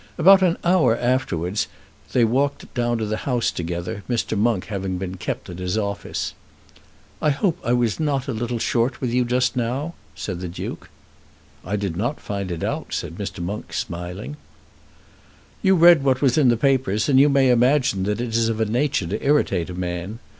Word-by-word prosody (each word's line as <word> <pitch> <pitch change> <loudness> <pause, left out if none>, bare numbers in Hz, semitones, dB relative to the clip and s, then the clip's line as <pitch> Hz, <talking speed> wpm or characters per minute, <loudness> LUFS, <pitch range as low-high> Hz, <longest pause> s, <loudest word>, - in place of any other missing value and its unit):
About 190 +3 +7
an 175 -2 +3
hour 170 -10 +3
afterwards 105 -7 0 0.4
they 120 -2 +4
walked 135 +5 -1
down 120 -1 0
to 110 - -2
the 110 +1 -2
Houses 125 -2 0
together, 85 +4 -4
Mr. 115 -2 -1
Monk 110 -2 +1
having 95 -3 -3
been 95 0 -5
kept 90 - -4
at 90 0 -8
his 90 +3 -2
office. 100 -2 -3 0.9
"I 150 - +3
hope 170 +4 0
I 120 - +1
was 120 0 +1
not 140 -4 0
a 135 - -2
little 120 +2 -2
short 115 +2 0
with 125 -3 -2
you 125 0 +3
just 125 +1 +1
now," 130 +7 -2 0.2
said 90 +3 -5
the 90 - -4
Duke. 85 - -7 0.7
"I 100 +4 -2
did 100 -5 -2
not 120 - -2
find 100 -2 -4
it 85 -2 -4
out," - - -3
said - - -4
Mr. 85 - -4
Monk, 100 +5 -5
smiling. 90 +11 -5 1.2
"You 190 -2 +4
read 170 -4 +7
what 130 -2 +2
was 130 -3 +3
in 145 -5 +4
the 120 - +3
papers, 125 -5 +1
and 135 -2 +5
you 145 +2 +6
may 135 -2 +4
imagine 125 -3 +3
that 105 +2 -1
it 120 -2 -3
is 115 -1 +2
of 115 -1 -2
a 110 - +2
nature 125 - 0
to 85 - -4
irritate 100 - +2
a 90 - -6
man. 90 +3 -4
115 Hz, 190 wpm, -22 LUFS, 100-135 Hz, 1.2 s, About